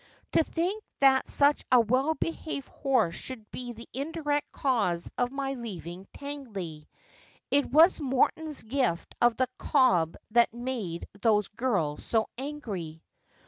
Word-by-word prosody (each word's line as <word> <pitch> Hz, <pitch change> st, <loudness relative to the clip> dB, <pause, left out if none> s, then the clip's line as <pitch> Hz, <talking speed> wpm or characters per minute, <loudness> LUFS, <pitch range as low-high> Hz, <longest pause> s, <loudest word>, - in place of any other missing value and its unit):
To -, -, +4 dB
think 365 Hz, +7 st, -2 dB, 0.2 s
that 270 Hz, -1 st, +5 dB
such 285 Hz, +1 st, +3 dB
a 250 Hz, -, +8 dB
well 255 Hz, +7 st, +2 dB
behaved 315 Hz, -4 st, -4 dB
horse 265 Hz, -, +1 dB
should 225 Hz, +1 st, -8 dB
be 245 Hz, -1 st, -5 dB
the 230 Hz, 0 st, -11 dB
indirect 290 Hz, +1 st, -2 dB
cause 205 Hz, -11 st, 0 dB
of 245 Hz, 0 st, 0 dB
my 275 Hz, 0 st, -2 dB
leaving 190 Hz, -7 st, -7 dB
Tangley! 205 Hz, -, -7 dB, 0.6 s
It 285 Hz, 0 st, +3 dB
was 320 Hz, +5 st, +6 dB
Morton's 290 Hz, +3 st, 0 dB
gift 225 Hz, -7 st, -1 dB
of 240 Hz, -1 st, +4 dB
the 255 Hz, -, +2 dB
cob 180 Hz, -, +3 dB
that 235 Hz, +1 st, +5 dB
made 240 Hz, -9 st, -4 dB
those 210 Hz, -3 st, +3 dB
girls 200 Hz, -11 st, -1 dB
so 225 Hz, -1 st, +1 dB
angry.' 215 Hz, -, -6 dB
255 Hz, 135 wpm, -28 LUFS, 205-280 Hz, 0.6 s, a